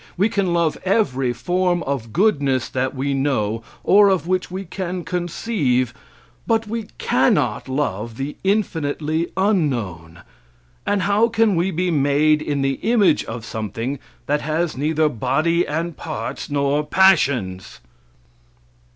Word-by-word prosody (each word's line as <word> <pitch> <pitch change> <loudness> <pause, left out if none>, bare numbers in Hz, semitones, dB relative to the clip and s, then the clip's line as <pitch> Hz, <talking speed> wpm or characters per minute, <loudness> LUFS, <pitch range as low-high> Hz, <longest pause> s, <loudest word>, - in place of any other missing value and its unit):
We 200 +5 +3
can 200 -4 0
love 170 -2 +1
every 135 - +1
form 175 +7 0
of 130 -5 -3
goodness 140 - +1
that 130 +2 -2
we 140 +1 -1
know, 120 -6 0 0.2
or 205 +1 +6
of 190 -4 +1
which 185 +1 -1
we 190 +2 -5
can 180 0 -4
conceive, 170 - -1 0.5
but 225 0 +2
we 220 0 -4
cannot - - +1
love 115 -5 -2
the 140 +2 -4
infinitely 160 -5 -1
unknown. 120 - -1 0.7
And 205 -2 +1
how 205 +4 +3
can 225 -3 +2
we 175 +3 +1
be 180 0 -1
made 150 +1 +3
in 145 -2 -1
the 135 0 0
image 210 -8 +3
of 115 0 -6
something 115 +5 -4 0.3
that 145 +1 0
has 155 +2 -1
neither 155 +3 +1
body 155 +7 +1
and 165 +2 -3
parts 155 +2 -5
nor 145 +1 +1
passions? 140 - +2
155 Hz, 135 wpm, -21 LUFS, 135-185 Hz, 0.7 s, or